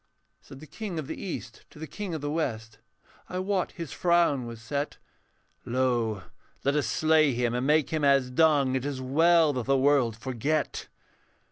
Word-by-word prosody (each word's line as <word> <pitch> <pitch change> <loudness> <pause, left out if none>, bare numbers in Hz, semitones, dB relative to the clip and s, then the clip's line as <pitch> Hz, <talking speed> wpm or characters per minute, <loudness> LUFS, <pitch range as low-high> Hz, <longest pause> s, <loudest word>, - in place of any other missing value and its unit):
Said 135 - -13
the - - -10
King 195 +1 -6
of 155 - -3
the - - -5
East 185 - -7
to - - -17
the 160 - -6
King 190 +1 -5
of 155 - -5
the 145 0 -3
West, 115 -8 -3 0.5
I 180 - -4
wot 185 0 -1
his 165 -5 -7
frown 170 -8 +2
was 115 -1 -8
set, 140 +5 -4 0.7
'Lo; 120 -5 0 0.4
let 140 +1 +1
us 145 -6 +1
slay 155 +3 +3
him 120 0 0
and 125 +2 -1
make 150 -1 +2
him 155 -2 -1
as 135 -2 +3
dung, 145 -2 +3
It 130 - -1
is 140 -2 -3
well 160 +4 +3
that 125 -2 -4
the 135 0 +3
world 130 -5 +2
forget.' 130 +5 -2
140 Hz, 180 wpm, -27 LUFS, 125-160 Hz, 0.7 s, slay